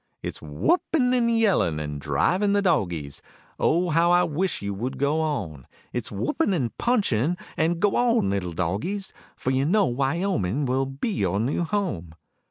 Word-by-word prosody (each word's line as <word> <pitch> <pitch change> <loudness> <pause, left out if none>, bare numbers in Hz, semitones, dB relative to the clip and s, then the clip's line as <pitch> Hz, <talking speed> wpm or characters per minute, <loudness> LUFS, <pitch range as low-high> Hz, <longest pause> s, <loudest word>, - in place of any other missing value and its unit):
It's - - -5
whooping 250 - +1
and 235 -2 +2
yelling 110 - +2
and 75 -1 -5
driving 180 - +1
the 205 0 +2
dogies; 85 - -1 0.4
Oh 175 +1 +2
how 165 +2 +3
I 175 0 +5
wish 175 +4 -1
you 100 0 -2
would 120 +7 -4
go 145 +3 +1
on; 90 - -3 0.3
It's 120 -2 -4
whooping 115 - 0
and 125 -8 -2
punching 180 - +1 0.2
and 165 0 +1
go 205 +2 +2
on 235 - +2
little 90 -3 -2
dogies, 105 - -2 0.2
For 130 - -2
you 130 +1 +1
know 200 +5 +3
Wyoming 135 - 0
will 130 +1 0
be 135 - -3
your 100 - 0
new 130 +9 0
home. 160 - -3
140 Hz, 165 wpm, -25 LUFS, -, 0.4 s, I